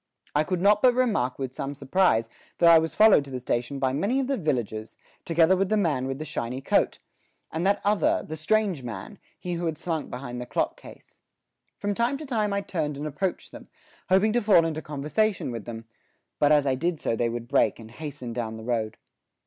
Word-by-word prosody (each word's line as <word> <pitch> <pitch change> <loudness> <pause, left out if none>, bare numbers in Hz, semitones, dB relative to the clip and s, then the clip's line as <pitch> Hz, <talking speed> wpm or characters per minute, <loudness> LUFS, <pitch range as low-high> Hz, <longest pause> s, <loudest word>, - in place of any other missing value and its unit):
I 150 - +3
could 180 +2 -2
not 205 +2 +4
but 250 -1 +5
remark 215 - +1
with 130 -2 -4
some 135 +2 -4
surprise 135 -6 +2 0.3
that 170 -1 +6
I 165 - +8
was 160 0 -3
followed 215 -8 +6
to - - -11
the 130 -1 -4
station 125 +2 -2
by 130 -1 0
many 200 - +1
of 270 - 0
the 275 +1 0
villagers, 115 - -3 0.3
together 165 +2 +4
with 190 0 0
the 215 - +2
man 145 -10 0
with 135 0 -3
the 155 - -6
shiny 130 -4 -4
coat, - - +1 0.5
and 170 +4 -1
that 200 - +2
other, 205 0 +2
the 155 - -5
strange 190 0 +1
man, 125 - -8 0.2
he 180 -2 -5
who 170 0 -2
had 160 -2 -2
slunk 165 -2 -3
behind 125 -1 -6
the 125 - -7
clock 115 - -1
case. - - -15 0.6
From 205 0 -2
time 235 +6 0
to 305 - -8
time 220 -6 0
I 200 0 0
turned 155 -7 -3
and 145 - -5
approached 155 +5 -3
them, - - -11 0.4
hoping 195 +4 +4
to 240 - +2
fall 200 -6 +5
into 160 -1 -2
conversation 155 - -1
with 115 -3 -6
them; 115 -1 -7 0.5
but 145 0 +4
as 150 -2 +5
I 135 - +2
did 165 +5 -1
so - - -1
they 115 +1 0
would 120 0 -5
break 135 +2 +2
and 110 0 -12
hasten 130 -3 -7
down 110 -2 -4
the 110 - -9
road. 110 -2 -2
155 Hz, 220 wpm, -26 LUFS, 125-195 Hz, 0.6 s, I